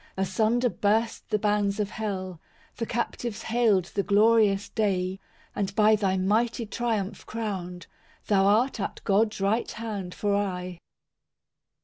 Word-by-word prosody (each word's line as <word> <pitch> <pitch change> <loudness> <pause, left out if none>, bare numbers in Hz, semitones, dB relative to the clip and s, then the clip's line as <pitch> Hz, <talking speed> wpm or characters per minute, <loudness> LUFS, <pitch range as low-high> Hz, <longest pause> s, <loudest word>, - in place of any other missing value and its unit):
III 190 - +1
Asunder 220 +6 +1
burst 220 +2 0
the 210 - +2
bands 205 -1 0
of 205 -1 -1
hell, 185 -5 -4 0.4
The 230 - -3
captives 235 -1 -3
hailed 220 -6 +2
the 200 - +1
glorious 205 0 +3
day; 190 -3 -1 0.4
And 200 -1 -2
by 215 0 +5
Thy 195 -2 0
mighty 225 +5 +1
triumph 220 -2 -2
crowned, 185 -6 -5 0.4
Thou 195 -2 +3
art 230 +5 +2
at 195 - -4
God's 210 +2 +2
right 205 +4 +1
hand 205 -5 -5
for 205 -1 0
aye. 180 -3 -3
205 Hz, 135 wpm, -26 LUFS, 195-220 Hz, 0.4 s, by